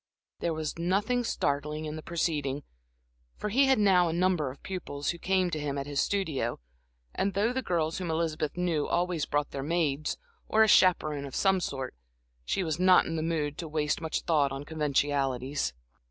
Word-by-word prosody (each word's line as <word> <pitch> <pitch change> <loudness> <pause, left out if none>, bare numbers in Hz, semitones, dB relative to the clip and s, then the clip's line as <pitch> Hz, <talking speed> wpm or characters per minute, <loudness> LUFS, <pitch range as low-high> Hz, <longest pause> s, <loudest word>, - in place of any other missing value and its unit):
There 170 -2 -1
was 155 +1 -4
nothing 205 +8 +1
startling 150 -5 -1
in 155 0 -4
the 155 - -6
proceeding, 150 -4 -1 0.7
for 210 - -3
he 265 +6 +4
had 265 - +4
now 185 -4 +4
a - - -1
number 175 -4 +1
of 130 - -12
pupils, 155 -6 -4
who 170 - -9
came 185 -1 +1
to 155 - -2
him 145 -1 -2
at 140 - -3
his 145 -1 0
studio; 155 -12 -1 0.5
and 195 -1 -1
though 215 +5 +2
the 260 - -1
girls 165 -7 -1
whom 180 -2 -3
Elizabeth 160 -1 -1
knew 170 -4 0
always 175 -3 0
brought 145 0 0
their 135 - -4
maids, 155 -1 0 0.3
or 220 0 +5
a - - +4
chaperone 155 -8 +4
of 135 - -8
some 190 -1 +3
sort, 135 -6 -4 0.5
she 190 - -1
was 160 -1 -2
not 185 0 +6
in 165 - -3
the 160 - -1
mood 155 -2 -1
to 170 - -4
waste 150 0 -1
much 160 -1 -2
thought 150 -5 +2
on 135 +1 -5
conventionalities. 140 - 0
160 Hz, 190 wpm, -29 LUFS, 145-180 Hz, 0.7 s, not